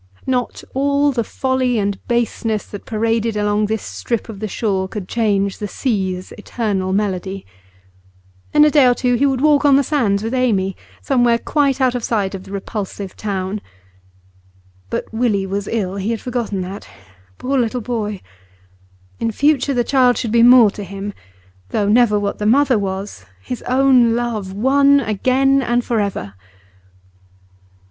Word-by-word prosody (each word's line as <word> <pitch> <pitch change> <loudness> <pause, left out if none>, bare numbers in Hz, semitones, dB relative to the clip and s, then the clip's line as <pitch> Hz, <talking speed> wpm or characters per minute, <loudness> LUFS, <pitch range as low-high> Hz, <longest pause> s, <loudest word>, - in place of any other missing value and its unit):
Not 250 -2 -2
all 280 +2 +2
the 240 -3 -1
folly 260 +1 -1
and 200 -2 -1
baseness 230 -2 -1
that 205 - -10
paraded 225 0 0
along 210 0 +1
this 220 0 -2
strip 235 -1 -4
of 210 -3 -8
the 215 - -3
shore 195 -2 -1
could 195 -2 -7
change 200 -4 0
the 210 - -3
sea's 190 -6 -2
eternal 205 -4 -2
melody. 195 -1 -2 1.1
In 300 0 +6
a 300 - +4
day 285 -4 +5
or 245 - +4
two 250 0 0
he 265 +4 +3
would 265 -2 0
walk 300 -1 +4
on 285 -2 +5
the 280 - +4
sands 225 -9 0
with 225 +3 -3
Amy, 205 -7 +1 0.3
somewhere 245 -3 +3
quite 280 +1 0
out 255 -2 +2
of 245 -2 -3
sight 205 -4 -1
of 190 -1 -7
the - - -12
repulsive 200 -1 -5
town. 195 0 -3 1.3
But - - -2
Willie 220 -4 +1
was 195 +1 -3
ill; 195 -4 -2
he 200 +2 -2
had 230 -1 -2
forgotten 235 -6 -3
that. 190 +2 -7 0.5
Poor 270 +1 -1
little 240 +1 0
boy! 210 -4 -3 1.0
In 230 - 0
future 285 +2 +1
the 240 - +2
child 250 -1 +3
should 230 - -2
be 230 0 +4
more 240 -3 +7
to 205 - -7
him; 200 +2 -6 0.6
though 205 -2 0
never 210 -1 +4
what 200 0 -3
the 210 - 0
mother 260 0 +4
was, 190 - -5
his 230 - -6
own 255 -3 +4
love, 230 -5 -3
won 275 +7 +4
again 265 +4 +2
and 240 -1 0
for 230 -2 0
ever. 195 - -3
225 Hz, 165 wpm, -19 LUFS, 200-255 Hz, 1.3 s, more